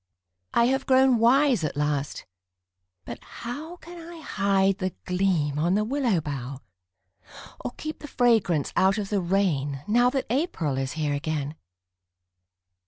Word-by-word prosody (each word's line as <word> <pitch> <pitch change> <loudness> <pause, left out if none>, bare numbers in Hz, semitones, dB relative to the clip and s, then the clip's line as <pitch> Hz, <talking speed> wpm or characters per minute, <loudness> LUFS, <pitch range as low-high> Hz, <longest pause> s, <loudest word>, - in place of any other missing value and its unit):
I 235 - +5
have 265 +2 0
grown 260 -2 +5
wise 250 - +4
at 150 - -2
last 145 -1 -1 0.8
but 120 - -8
how 295 +9 -7
Can 345 0 -12
I 335 - -10
hide 195 -7 +1
the 185 -1 -2
gleam 180 -6 +1
on 170 +4 +2
the 210 - +2
willow 240 -5 +1
bough, 140 -3 -5 1.0
Or - - -2
keep 310 0 -6
the 295 - -8
fragrance 220 - +2
out 190 +2 +3
of 200 -2 -3
the 205 -2 +1
rain 155 -7 0
Now 240 +3 +4
that 270 0 -2
April 190 - -1
is 130 -1 -2
here 150 -2 -1
again? 145 0 -2
195 Hz, 145 wpm, -26 LUFS, 150-250 Hz, 1.0 s, I